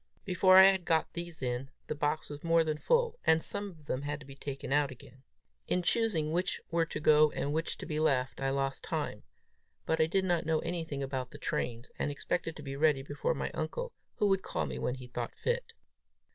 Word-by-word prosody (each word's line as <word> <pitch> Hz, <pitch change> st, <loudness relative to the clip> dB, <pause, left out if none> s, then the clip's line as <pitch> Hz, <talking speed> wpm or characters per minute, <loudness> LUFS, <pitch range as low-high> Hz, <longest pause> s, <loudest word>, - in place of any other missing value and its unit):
Before 185 Hz, +1 st, +5 dB
I 190 Hz, -, +11 dB
had 190 Hz, -1 st, +5 dB
got 160 Hz, -1 st, +1 dB
these 170 Hz, -4 st, -5 dB
in, 125 Hz, +2 st, -2 dB, 0.2 s
the -, -, -2 dB
box 150 Hz, +1 st, -1 dB
was 145 Hz, 0 st, -8 dB
more 165 Hz, 0 st, +4 dB
than 155 Hz, -1 st, -2 dB
full, 475 Hz, -, +2 dB
and 160 Hz, -, +5 dB
some 200 Hz, +4 st, -3 dB
of 160 Hz, -5 st, -16 dB
them 130 Hz, -2 st, -2 dB
had 145 Hz, +1 st, -3 dB
to 150 Hz, -, -12 dB
be 135 Hz, -, -10 dB
taken 140 Hz, -1 st, -4 dB
out 145 Hz, -1 st, +3 dB
again. 130 Hz, 0 st, -13 dB, 0.5 s
In 180 Hz, -, +1 dB
choosing 175 Hz, -8 st, +1 dB
which 180 Hz, +3 st, 0 dB
were 165 Hz, -1 st, +2 dB
to -, -, -4 dB
go 155 Hz, 0 st, +6 dB
and 145 Hz, -, -1 dB
which 160 Hz, +1 st, -1 dB
to -, -, -7 dB
be 155 Hz, -1 st, -2 dB
left, 135 Hz, -4 st, +1 dB
I 135 Hz, -, +1 dB
lost 135 Hz, 0 st, -1 dB
time; -, -, -3 dB, 0.6 s
but 160 Hz, 0 st, +1 dB
I 160 Hz, -, +4 dB
did 190 Hz, +3 st, +1 dB
not 175 Hz, -2 st, +1 dB
know 160 Hz, 0 st, +1 dB
anything 165 Hz, -5 st, -3 dB
about 130 Hz, -2 st, -3 dB
the -, -, -10 dB
trains, 120 Hz, +1 st, -3 dB
and -, -, 0 dB
expected 165 Hz, +3 st, -2 dB
to 150 Hz, -, -9 dB
be 135 Hz, -1 st, -5 dB
ready 145 Hz, -2 st, +3 dB
before 145 Hz, +1 st, -1 dB
my -, -, -3 dB
uncle, 165 Hz, -, -3 dB, 0.2 s
who -, -, +1 dB
would 195 Hz, -1 st, +3 dB
call 80 Hz, -, -2 dB
me 65 Hz, -2 st, -5 dB
when 125 Hz, -, -1 dB
he 130 Hz, -1 st, -9 dB
thought 120 Hz, -1 st, -5 dB
fit. -, -, -2 dB
155 Hz, 225 wpm, -31 LUFS, 135-170 Hz, 0.6 s, I